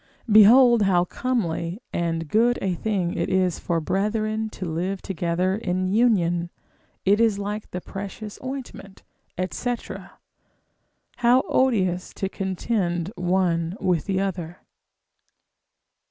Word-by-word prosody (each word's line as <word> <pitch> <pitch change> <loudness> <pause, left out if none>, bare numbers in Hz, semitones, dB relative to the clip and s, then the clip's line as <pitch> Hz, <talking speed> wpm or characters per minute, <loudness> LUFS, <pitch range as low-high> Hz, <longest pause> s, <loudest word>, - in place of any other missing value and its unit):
Behold 235 +3 +7
how 180 -3 +3
comely 180 -6 -2
and 165 -1 -1
good 235 +8 +3
a 190 -2 -1
thing 185 -2 -1
it - - -2
is 185 -2 +1
for 170 -2 -1
brethren 215 +5 -1
to 185 - -7
live 180 +4 -2
together 180 0 -1
in 185 -3 -1
union: 185 -5 +2 0.6
it 200 +2 +4
is 225 -3 +3
like 205 +1 -4
the 180 - -5
precious 200 +3 -7
ointment, 255 -7 -7 0.5
&c. 245 0 -1 1.4
How 245 +2 +4
odious 190 -9 +1
to 195 - -2
contend 190 -2 -2
one 180 -1 0
with 180 -5 0
the 195 -2 0
other! 180 -3 -4
190 Hz, 115 wpm, -24 LUFS, 175-215 Hz, 1.4 s, Behold